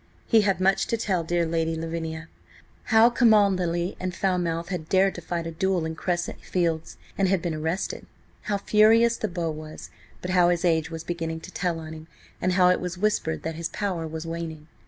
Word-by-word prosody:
He 225 -2 +5
had 195 -3 +1
much 195 +1 +2
to 230 - 0
tell 190 -6 0
dear 170 +1 0
Lady 165 0 -1
Lavinia. 160 0 -4 0.6
How 225 +1 +5
Cholmondely 195 -7 +3
and 185 -1 -3
Falmouth 175 -3 -1
had 175 -4 -4
dared 190 0 +3
to 175 - -8
fight 170 0 -3
a 165 - -4
duel 180 0 0
in 160 - -3
Crescent 175 +1 -3
Fields, 165 -3 -2 0.2
and 195 - +3
had 190 0 +2
been 165 0 -3
arrested. 160 +4 -3 0.4
How 205 - +1
furious 225 +3 +4
the 215 - -2
Beau 170 -3 -2
was, 155 - -9 0.3
but 180 - -4
how 180 -1 +5
his 175 0 +1
age 160 -2 +2
was 165 -1 -6
beginning 165 -1 -4
to 185 - -10
tell 175 -3 -1
on 160 0 -8
him, 160 0 -10 0.3
and 185 0 +1
how 180 -1 +5
it 180 - +3
was 180 0 -4
whispered 185 -5 0
that 160 - -3
his 165 +1 -4
power 185 -6 -3
was 160 +1 -6
waning. 165 -2 -5
175 Hz, 200 wpm, -25 LUFS, 160-190 Hz, 0.6 s, He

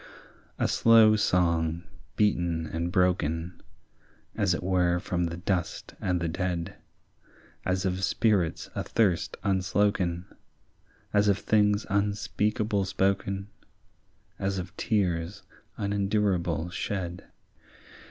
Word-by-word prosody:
A - - +1
slow 110 -2 +6
song 85 -4 +1 0.3
beaten 85 -6 +1
and 85 +2 -3
broken, 90 -2 0 0.7
As 100 -5 +2
it - - -5
were 90 -1 +2
from 90 0 -1
the 85 0 -4
dust 90 -1 -2
and 90 -1 0
the 85 - -1
dead, 85 0 -3 0.9
As 95 +1 0
of 95 0 -1
spirits 95 -5 +1
athirst 95 -7 0
unsloken, 95 -2 +1 0.9
As 105 0 +4
of 100 -1 +4
things 105 -1 +2
unspeakable 105 0 0
spoken, 100 0 -1 0.9
As 95 0 -1
of 90 0 -6
tears 90 -4 -1 0.3
unendurable 100 -5 0
shed. 90 -2 -4
95 Hz, 100 wpm, -28 LUFS, 85-100 Hz, 0.9 s, slow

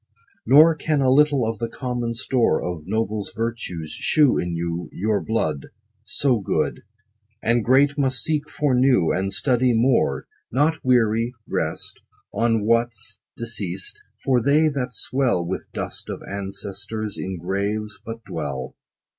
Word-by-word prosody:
Nor 155 +6 +8
can 155 -1 0
a 130 -2 +3
little 140 -3 +4
of 115 -2 -3
the 115 -1 -2
common 120 -2 -3
store 130 0 +2
Of 85 -3 -5
nobles' 110 0 -2
virtue, 115 -8 -3
shew 140 - +3
in 85 -1 -2
you; 85 +1 -3
Your 105 +2 0
blood 80 -11 -1 0.4
So 130 -5 +1
good 95 - -1 0.6
And 115 0 +2
great, 140 +4 +4
must 130 -4 +2
seek 155 -2 -1
for 145 -3 0
new, 125 -9 +4
And 95 +1 -1
study 125 0 +2
more: 115 - +2 0.3
Not 150 +5 +1
weary, 120 -1 +2
rest - - -3 0.3
On 115 -2 +1
what's 115 -1 0 0.2
deceas't. 100 -6 -3 0.2
For 125 -2 +3
they, 150 +5 +4
that 135 -3 -3
swell 125 -8 +1
30 85 - -6
With 95 - -5
dust - - -6
of - - -5
ancestors, 100 +2 -4
in 95 -1 -4
graves 100 +4 -2
but 115 0 -7
dwell. 70 -8 -5
115 Hz, 145 wpm, -23 LUFS, 100-130 Hz, 0.6 s, Nor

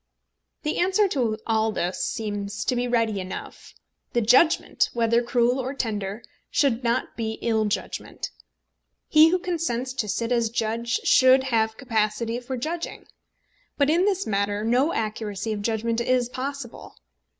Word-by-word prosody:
The 300 - -1
answer 380 +3 +3
to 235 -9 0
all 220 -1 +1
this 180 -3 -2
seems 205 -2 -3
to 255 - +1
be 245 0 0
ready 230 -4 +1
enough. 185 0 -8 0.4
The 240 - +2
judgment, 260 +9 +3
whether 235 0 +2
cruel 245 +1 +1
or 260 +2 -3
tender, 210 -3 -3 0.3
should 260 -4 +1
not 235 +1 -1
be 220 -1 -2
ill 220 -2 +2
judgment. 205 - -4 0.8
He 310 +1 +7
who 365 - +2
consents 310 -9 -2
to 215 -5 -3
sit 230 +4 -1
as 235 -2 +2
judge 230 +1 -1
should 260 0 +6
have 220 -4 0
capacity 230 -2 -1
for 255 +1 -5
judging. 325 +7 -4 0.7
But 285 +1 +3
in 345 +4 +3
this 395 -1 +1
matter 205 +1 -1
no 250 +8 +2
accuracy 215 -1 -3
of 205 - -4
judgment 230 +2 -1
is 245 0 +1
possible. 265 -1 -6
235 Hz, 150 wpm, -25 LUFS, 220-260 Hz, 0.8 s, He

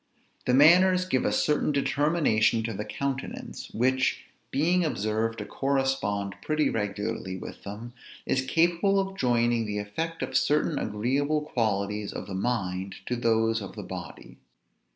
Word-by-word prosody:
The 125 - +4
manners 180 +6 +6
give 130 -8 0
a - - +2
certain 150 0 +1
determination 140 -6 +2
to 115 0 -3
the 105 +1 -4
countenance; 135 -1 -5
which, 130 +3 +1 0.2
being 175 +5 +2
observed 115 -5 -1
to 105 - -5
correspond 135 -6 -1
pretty 155 -1 +1
regularly 105 -2 -3
with - - -9
them, 110 +4 -8 0.3
is 130 - +1
capable 170 +7 +2
of 195 0 -2
joining 120 - +1
the 105 0 -3
effect 160 +12 -3
of 130 - -5
certain 150 +2 +2
agreeable 140 +8 0
qualities 105 -6 -1
of - - -5
the 100 - -7
mind 95 -3 -2
to 125 - -1
those 115 -1 +1
of 100 - -8
the - - -6
body. - - -9
120 Hz, 145 wpm, -27 LUFS, 105-150 Hz, 0.3 s, manners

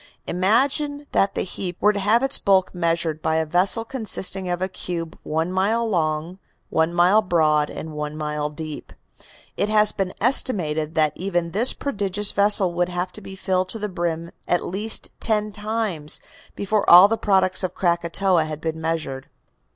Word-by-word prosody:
Imagine 275 - 0
that 195 - +1
the - - 0
heap 180 -1 -5
were 210 +1 +4
to 205 - -3
have 215 +5 +2
its 270 +1 +2
bulk 190 -2 +2
measured 165 -3 -1
by 160 - 0
a 160 0 +1
vessel 185 +8 +1
consisting 195 -6 -2
of 175 0 -1
a 185 - -1
cube 170 -3 -5
one 160 +3 -2
mile 215 +5 +1
long, 165 -1 -1 0.3
one 160 +1 +2
mile 180 +5 +4
broad 155 -5 +2
and 160 - -7
one 150 0 -5
mile 150 -1 -2
deep; 155 0 -8 0.6
it 205 - 0
has 215 -1 +4
been 190 -2 -3
estimated 165 - 0
that 155 -2 +2
even 175 -2 -2
this 225 +7 +4
prodigious 205 -6 -1
vessel 200 -3 +2
would 175 +1 0
have 180 +1 -3
to 215 - -11
be 195 -1 -9
filled 185 -1 -1
to - - -4
the 210 -1 -4
brim 170 -2 -3 0.2
at 175 - +1
least 210 +5 -1
ten 215 -1 0
times 210 -7 -2 0.4
before 205 +1 0
all 180 +3 +10
the 225 - 0
products 190 -3 +2
of 185 -1 -3
Krakatoa 170 0 +1
had 155 -1 -6
been 160 0 -4
measured." 155 -5 -3
185 Hz, 175 wpm, -22 LUFS, 160-205 Hz, 0.6 s, all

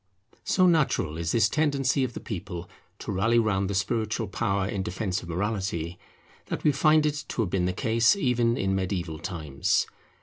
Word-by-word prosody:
So 185 - +3
natural 150 - +2
is 85 0 -1
this 115 -2 +4
tendency 140 -1 +1
of 125 -2 -2
the - - -6
people 90 -4 -6 0.3
to - - -5
rally 105 +5 +2
round 100 -4 +1
the 100 - -2
spiritual 110 +2 -1
power 100 -1 -1
in 100 -1 -2
defence 95 +1 -2
of 85 - -10
morality, 90 -2 -2 0.5
that - - -4
we 150 - +5
find 155 +2 +4
it 150 0 -1
to - - -2
have 90 - -4
been 90 -2 +1
the 90 - +1
case 115 - +3
even 125 -8 +1
in 95 0 0
mediaeval 90 -4 -2
times. 80 -5 -1
100 Hz, 180 wpm, -27 LUFS, 90-120 Hz, 0.5 s, we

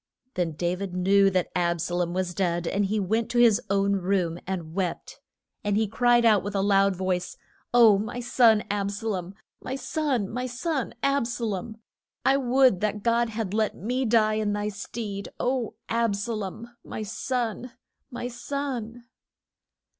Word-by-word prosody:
Then 175 -3 -1
Da 175 +3 -1
vid 185 -1 -5
knew 195 +2 +4
that 185 -2 -1
Ab 175 -1 +1
sa 170 +2 -3
lom 175 -1 0
was 180 0 -2
dead, 175 -2 0
and 200 +4 0
he 210 +2 0
went 220 +4 0
to 245 - -2
his 235 -4 +5
own 200 0 +2
room 180 -3 0
and 175 -4 -4
wept. 180 -2 -3 0.4
And 205 0 +1
he 220 - +2
cried 240 +3 +3
out 215 -4 +5
with 205 +1 -5
a 195 - +2
loud 195 -1 +3
voice, 185 -1 -2 0.3
O, 225 -4 +6
my 235 +4 -4
son, 235 -3 +4
Ab 200 -1 -1
sa 200 +2 -6
lom; 190 -2 -3 0.3
my 260 - -4
son, 275 -6 -1
my 250 +4 -3
son 265 +2 -3
Ab 275 -3 +2
sa 235 0 -3
lom! 215 +1 -4 0.5
I 270 - +5
would 260 -5 +3
that 210 -1 -1
God 235 0 +2
had 215 -3 -4
let 215 0 +1
me 250 +6 -1
die 215 -2 +3
in 205 -1 0
thy 205 0 -1
stead, 200 0 -6
O, 250 -2 -1
Ab 230 -2 +1
sa 205 +4 -3
lom, 220 +3 -6
my 215 - -6
son, 245 +2 -3 0.4
my 245 0 -5
son! 245 -2 -4
210 Hz, 175 wpm, -26 LUFS, 195-240 Hz, 0.5 s, O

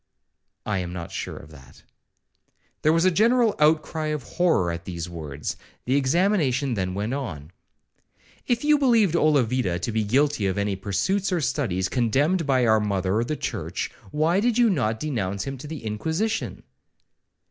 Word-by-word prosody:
'—'I 100 -3 -1
am 90 -1 -4
not 85 -2 -6
sure - - -5
of 80 - -12
that.' 65 -4 -16 1.0
There 155 - +4
was 165 +2 +3
a 185 - +5
general 230 +4 +3
outcry 155 +1 +2
of 150 -3 -2
horror 160 - +1
at 85 0 -6
these 85 -2 -5
words. 75 -4 -6 0.3
The 130 - +1
examination 140 -3 +2
then 95 -3 -2
went 105 +5 -2
on. 90 - -5 1.0
'If 240 +1 +1
you 300 0 +4
believed 230 - +4
Olavida 130 - +2
to 90 +6 -3
be 110 0 0
guilty 130 0 +1
of 95 - -1
any 100 -1 0
pursuits 185 - -1
or 180 - +1
studies 120 - -1
condemned 145 - +1
by 130 -3 +3
our 110 -1 +4
mother 100 +1 0
the 155 +6 -2
church, - - -4 0.2
why 160 - +2
did 235 +2 +1
you 240 -3 +5
not 110 - 0
denounce 100 -10 -2
him 135 0 -4
to 150 - -8
the 155 -6 -7
Inquisition?' 160 - -2
130 Hz, 165 wpm, -24 LUFS, 100-165 Hz, 1.0 s, a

